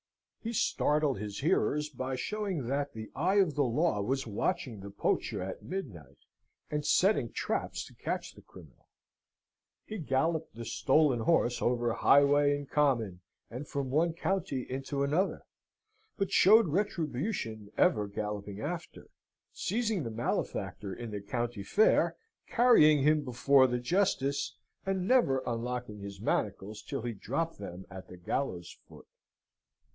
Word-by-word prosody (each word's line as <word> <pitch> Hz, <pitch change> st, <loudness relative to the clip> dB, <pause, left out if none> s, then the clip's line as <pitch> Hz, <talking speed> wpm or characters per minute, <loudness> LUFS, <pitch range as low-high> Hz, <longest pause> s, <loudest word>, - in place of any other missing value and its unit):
He 230 Hz, +1 st, -5 dB
startled 150 Hz, -, +1 dB
his 105 Hz, -1 st, -5 dB
hearers 150 Hz, 0 st, +1 dB
by 130 Hz, -1 st, -4 dB
showing 195 Hz, -, -3 dB
that 140 Hz, +3 st, -2 dB
the 110 Hz, -1 st, -8 dB
Eye 180 Hz, +7 st, +1 dB
of 190 Hz, -6 st, +4 dB
the 145 Hz, -, 0 dB
Law 135 Hz, -2 st, +1 dB
was 135 Hz, +6 st, -1 dB
watching 115 Hz, -, -2 dB
the 100 Hz, +1 st, -8 dB
poacher 100 Hz, 0 st, -1 dB
at 95 Hz, -, -6 dB
midnight, 100 Hz, -, -7 dB, 0.5 s
and 150 Hz, 0 st, -1 dB
setting 180 Hz, -, +3 dB
traps -, -, -2 dB
to -, -, -15 dB
catch -, -, -4 dB
the -, -, -15 dB
criminal. 80 Hz, -8 st, -17 dB, 1.0 s
He 215 Hz, -, -6 dB
galloped 155 Hz, 0 st, -1 dB
the 115 Hz, 0 st, -7 dB
stolen 135 Hz, +3 st, +2 dB
horse 120 Hz, -1 st, +2 dB
over 120 Hz, -1 st, +1 dB
highway 145 Hz, +2 st, +4 dB
and 145 Hz, -1 st, -8 dB
common, 120 Hz, -12 st, +1 dB, 0.3 s
and 130 Hz, +5 st, -6 dB
from 140 Hz, -2 st, -3 dB
one 160 Hz, +4 st, +2 dB
county 165 Hz, -7 st, -2 dB
into 135 Hz, +2 st, -3 dB
another, 160 Hz, +8 st, 0 dB, 0.7 s
but 195 Hz, -3 st, -1 dB
showed 215 Hz, 0 st, +6 dB
Retribution 150 Hz, -, -2 dB
ever 105 Hz, -1 st, +3 dB
galloping 105 Hz, 0 st, -5 dB
after, 170 Hz, +6 st, -6 dB, 0.4 s
seizing 220 Hz, -3 st, -1 dB
the 120 Hz, -, -4 dB
malefactor 110 Hz, -3 st, -3 dB
in 120 Hz, -2 st, -7 dB
the 105 Hz, -1 st, -4 dB
country 120 Hz, +1 st, -3 dB
fair, 205 Hz, -, +3 dB, 0.3 s
carrying 155 Hz, -, +5 dB
him 150 Hz, 0 st, +3 dB
before 130 Hz, +1 st, +4 dB
the 125 Hz, -1 st, -1 dB
justice, 140 Hz, -1 st, 0 dB, 0.3 s
and 190 Hz, -1 st, -1 dB
never 210 Hz, -, +3 dB
unlocking 120 Hz, -2 st, -3 dB
his 100 Hz, 0 st, -8 dB
manacles 105 Hz, +2 st, -2 dB
till 135 Hz, -5 st, -5 dB
he 120 Hz, -1 st, -3 dB
dropped 160 Hz, +9 st, -3 dB
them 95 Hz, -2 st, -8 dB
at 95 Hz, 0 st, -9 dB
the 90 Hz, -, -11 dB
gallows 90 Hz, -1 st, -3 dB
foot. -, -, -14 dB
135 Hz, 140 wpm, -31 LUFS, 110-160 Hz, 1.0 s, showed